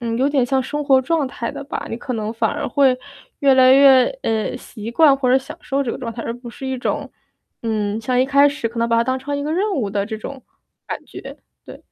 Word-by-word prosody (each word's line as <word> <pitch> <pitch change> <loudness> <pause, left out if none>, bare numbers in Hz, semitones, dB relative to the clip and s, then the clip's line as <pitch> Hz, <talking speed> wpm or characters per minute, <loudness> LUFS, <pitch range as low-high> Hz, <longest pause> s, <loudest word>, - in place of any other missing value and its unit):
嗯， 230 -1 -2
有 270 +2 +2
点 275 -3 +2
像 265 +1 +1
生 295 +3 -4
活 270 -2 +5
状 320 0 0
态 235 -3 -5
的 280 - -8
吧。 290 - -5
你 225 - -3
可 250 +1 -5
能 215 -2 -3
反 225 -1 0
而 - - -3
会 260 0 +3 0.4
越 275 -2 +5
来 260 0 +6
越， 270 -1 +7 0.2
呃， 220 0 -1
习 225 -2 -8
惯 285 +1 +5
或 255 -2 0
者 260 - +5
享 265 - -10
受 275 +1 -1
这 245 - -3
个 - - -4
状 235 -3 -5
态， 230 - -6
而 230 - -4
不 245 -1 -10
是 265 - -8
一 265 0 -2
种， 250 - -3 0.5
嗯， 215 -2 -1
像 250 +2 +1
一 260 - +2
开 280 +1 +5
始 285 -5 -3
可 230 +1 -8
能 230 - +2
把 230 - +2
它 230 - +4
当 260 +1 -1
成 285 +2 -5
一 285 - -3
个 300 - -3
任 400 +4 0
务 230 -9 -1
的 200 -1 -1
这 220 +1 -6
种 265 +3 -8 0.4
感 - - -5
觉。 - - -10 0.3
对。 - - -12
255 Hz, 280 characters per minute, -20 LUFS, 230-275 Hz, 0.5 s, 越